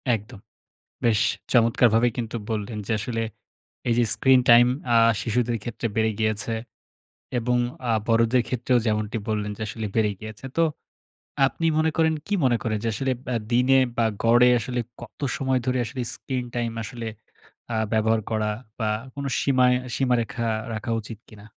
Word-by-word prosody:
একদম। 110 +1 -9 0.7
বেশ 110 -3 +3 0.3
চমৎকারভাবেই 115 0 +4
কিন্তু 115 -1 -3
বললেন 110 0 -3
যে - - -2
আসলে 115 +2 -2 0.7
এইযে 120 +1 +3
স্ক্রিন-টাইম 120 0 +6 0.3
আ - - +7 0.2
শিশুদের 120 0 0
ক্ষেত্রে 120 0 -3
বেড়ে 110 0 +2
গিয়েছে। 110 0 +1 0.9
এবং 125 +1 +1 0.3
আ - - +3 0.2
বড়দের 115 +2 +3
ক্ষেত্রেও 125 0 +1
যেমনটি 110 +1 -1
বললেন 105 -1 -1
যে - - -9
আসলে 110 +1 -5
বেড়ে 110 -2 +2
গিয়েছে। 110 +2 -9
তো 165 - +5 0.8
আপনি 165 +4 -2
মনে 160 0 +3
করেন 160 -1 +3
কি 205 - -1
মনে 125 -2 +4
করেন 110 -1 -1
যে - - +1
আসলে 135 +2 0
ব্যা 125 - -1 0.2
দিনে 125 +2 +4 0.2
বা 120 - +2 0.2
গড়ে 120 +2 +6
আসলে 120 +2 -3 0.2
কত 120 - -12 0.2
সময় 130 -1 +1
ধরে 130 0 +1
আসলে 125 +2 -4
স্ক্রিন 130 -2 -4
টাইম 120 -1 -1
আসলে 115 +1 -6 0.7
আ - - 0 0.2
ব্যবহার 110 0 +2
করা 110 -1 0 0.3
বা 110 - 0 0.3
কোন 140 - -5 0.2
সীমা 130 -2 +3 0.3
সীমারেখা 120 -2 0 0.3
রাখা 110 +2 -4
উচিত 110 0 -8
কিনা? 105 -2 -14
115 Hz, 155 wpm, -24 LUFS, 110-125 Hz, 0.9 s, আ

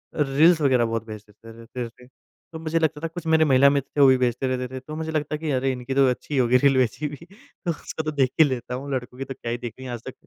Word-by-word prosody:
Reels 155 +3 +4
वग़ैरह 130 -4 +3
बहुत 115 -1 -3
भेजते 110 +1 -11
रहते 115 +2 -7
थे। 125 +2 -19 0.4
तो 160 - -7
मुझे 160 +1 -1
लगता 155 -2 0
था 165 - -2
कुछ 165 +1 -8
मेरे 160 0 +4
महिला 140 -1 +6
मित्र 140 -1 -1
थे - - +4
वो 140 - +8
भी 130 0 +6
भेजते 125 +1 0
रहते 125 0 -2
थे। - - -4
तो 150 +4 -9
मुझे 160 0 -4
लगता 150 -1 -2
था - - -6
कि 160 -1 -4
अरे 135 0 +1
इनकी 125 +1 -5
तो 135 -1 +5
अच्छी 125 +4 -4
ही - - +1
होगी 125 0 +4
रील 135 +1 +3
वैसे 130 +4 0
भी, 145 - -7
तो 200 0 -11
उसको 160 0 -6
तो 155 - -2
देख 135 -4 +2
ही 160 - +8
लेता 125 -3 -3
हूँ। 135 +3 -6
लड़कों 125 -1 -4
की 135 - -4
तो 135 - -6
क्या 120 -2 -6
ही 120 - -1
देखनी 120 +2 -8
आज 120 -2 -5
तक 130 - -6
135 Hz, 285 wpm, -24 LUFS, 125-155 Hz, 0.4 s, वो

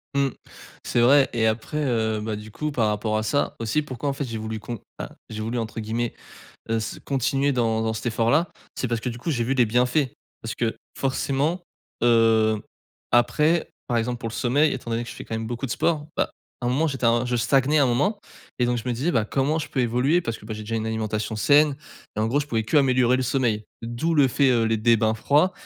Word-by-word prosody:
Mmh. 140 -1 +3 0.5
C'est 120 - 0
vrai 135 +3 +6
et 115 -2 +1
après 110 +7 -2
heu 110 -4 0
bah, 110 0 -3
du 105 +1 -9
coup 150 +7 -3
par 115 -5 +2
rapport 110 +1 0
à 110 - -1
ça 125 +7 0
aussi, 115 +7 0
pourquoi 140 -1 -4
en - - 0
fait, 140 +1 -3
j'ai 115 -3 -5
voulu 110 0 -4
con 120 +2 -6 0.2
ah, - - -5 0.2
j'ai 110 0 -5
voulu 115 +3 -2
entre 115 -1 -4
guillemets, 115 +2 -2 0.6
heu, 115 0 +1
ce 110 - -5
«continuer 135 +1 +1
dans 115 -3 +1
dans 110 0 0
cet 110 - -5
effort-là» 120 +9 +2 0.3
c'est 130 - -2
parce 115 -1 -2
que 125 - -1
du 120 - -7
coup, 160 - -3
j'ai 120 -5 0
vu 130 +3 0
des 125 -3 +4
bienfaits. 125 +4 +1 0.3
Parce 115 - -5
que 115 -2 -1 0.2
forcément, 140 +5 0 0.4
heu, 115 -2 +4 0.5
après, 150 +7 +3 0.2
par 120 - 0
exemple 120 +1 -2
pour 115 - -4
le - - -8
sommeil, 140 +7 +2
étant 120 -2 -5
donné 115 +1 -1
que 120 - -8
je - - -8
fais - - -8
quand - - -5
même 110 0 -3
beaucoup 120 +3 -3
de - - -8
sport. 155 +2 0
Bah, - - +1 0.3
à - - 0
un - - +2
moment 150 +6 +2
j'étais 135 -4 -3
un 115 +1 +3
je 125 0 0
stagnais 135 +5 +3
à - - +5
un - - +3
moment 165 - +1 0.4
et 125 - +3
donc 120 0 +1
je 120 - -5
me 120 - 0
disais: 135 +9 0
«Bah, 110 -2 +1
comment 140 +7 0
je 155 - -4
peux 130 - -1
évoluer?» 125 +8 +2
parce 115 -5 -4
que 105 - -14
bah, 110 - -4
j'ai 105 - -7
déjà 115 +2 -3
une 110 0 -2
alimentation 110 -1 -2
saine 145 +4 +4 0.4
et - - 0
en 110 - +2
gros, 140 +5 +2
je 145 - -4
pouvais 115 -6 0
qu'améliorer 130 0 +3
le - - 0
sommeil. 120 -4 0 0.2
D'où 120 +8 -1
le 145 -3 +5
fait, 135 +2 +3
heu, 120 -2 +3
les 110 0 +1
des 115 +2 +4
bains 110 0 +1
froids 145 - +3
120 Hz, 250 wpm, -24 LUFS, 110-135 Hz, 0.6 s, vrai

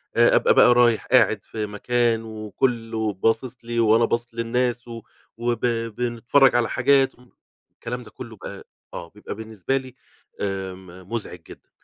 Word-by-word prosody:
آآ - - +5
أبقى - - +4
بقى 125 - +6
رايح 120 -2 +3
قاعد 110 -5 +3
في 110 -1 -5
مكان 115 +2 0
وكلّه 110 0 -2
باصص 115 +6 -1
لي، 120 0 -2
وأنا 115 +1 +4
باصص 120 +1 -2
للناس 120 +1 -1
و 115 -1 -8 0.4
وب 120 0 -1
بنتفرج 120 +3 +2
على 120 -1 +2
حاجات 135 +1 +3
أم 125 0 -22 0.4
الكلام 125 +1 -6
ده 110 - -15
كلّه 115 -3 -10
ب - - -13
أ - - -8 0.3
آه، 85 - -7
بيبقى 105 +2 -8
بالنسبة 110 +3 -3
لي 130 -1 -8 0.5
آمم 95 -2 -6
مُزعج 105 -6 -4
جدًا، - - -14
115 Hz, 155 wpm, -23 LUFS, 110-120 Hz, 0.5 s, بقى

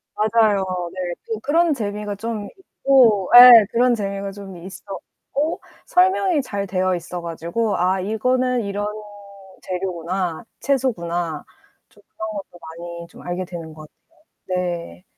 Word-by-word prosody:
맞아요. 215 -2 +2 0.3
네. 180 -2 -3
또 220 -1 -3
그런 325 +3 +2
재미가 210 -3 -4
좀 215 0 -5
있고 250 - +2
예. 245 -3 +11
그런 245 +1 +3
재미가 200 -1 -4
좀 195 -2 -10
있었고 195 - -6 0.2
설명이 365 -3 +3
잘 200 -6 -4
되어 185 -1 0
있어 175 +1 -6
가지고 170 +6 -2
'아 185 +2 +1
이거는 250 +5 0
이런 205 +1 -3 0.7
재료구나. 180 0 -3 0.2
채소구나.' 175 - -1 0.5
좀 - - -24
그런 215 0 -7
것도 195 -4 -8
많이 170 +1 -9
좀 - - -15
알게 175 +1 -4
되는 165 -3 -8
것 155 -1 -12 0.6
같아요. 185 -1 -1
네. 170 - -4
200 Hz, 255 characters per minute, -21 LUFS, 175-230 Hz, 0.7 s, 예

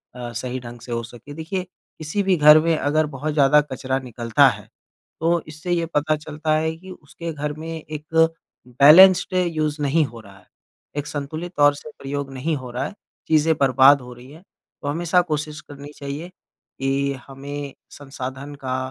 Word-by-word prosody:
अ, 120 -1 -6
सही 125 +2 -4
ढंग 120 -1 -10
से 120 - -10
हो 115 0 -1
सके। 120 +4 -11
देखिए 165 +5 -4 0.3
किसी 160 +6 -2
भी 190 -1 +3
घर 150 +1 +8
में 165 +1 +2
अगर 155 +2 +1
बहुत 150 +1 -4
ज़्यादा 150 0 +5
कचरा 130 -2 -3
निकलता 120 -3 +2
है, - - -2 0.5
तो 170 +1 +1
इससे 155 +3 -6
ये 170 -1 +1
पता 155 +1 +2
चलता 155 +1 -3
है 160 +1 -1
कि 185 +3 -12
उसके 170 0 -8
घर 150 0 -3
में 160 +2 -8
एक 155 -2 -7 0.7
बैलेंस्ड 185 +7 +8
यूज़ 155 -4 0
नहीं 145 +3 +2
हो 120 -3 -10
रहा 100 -3 -15
है, 90 - -22 0.5
एक 145 0 -2
संतुलित 155 +4 -5
तौर 145 0 +6
से 150 +1 -10
प्रयोग 140 0 -4
नहीं 145 +5 -2
हो 130 -2 -8
रहा 125 +3 -2
है, - - -6 0.3
चीज़ें 160 0 +3
बर्बाद 135 +1 +6
हो 125 0 -10
रही 125 +2 -14
हैं। 160 +4 -15 0.4
तो 145 - -5
हमेशा 170 +4 +2
कोशिश 150 0 -3
करनी 145 0 -11
चाहिए 140 +4 -6
कि 140 -5 -4
हमें 140 +1 -7 0.3
संसाधन 135 +1 -7
का 130 0 -1
145 Hz, 180 wpm, -22 LUFS, 135-155 Hz, 0.7 s, घर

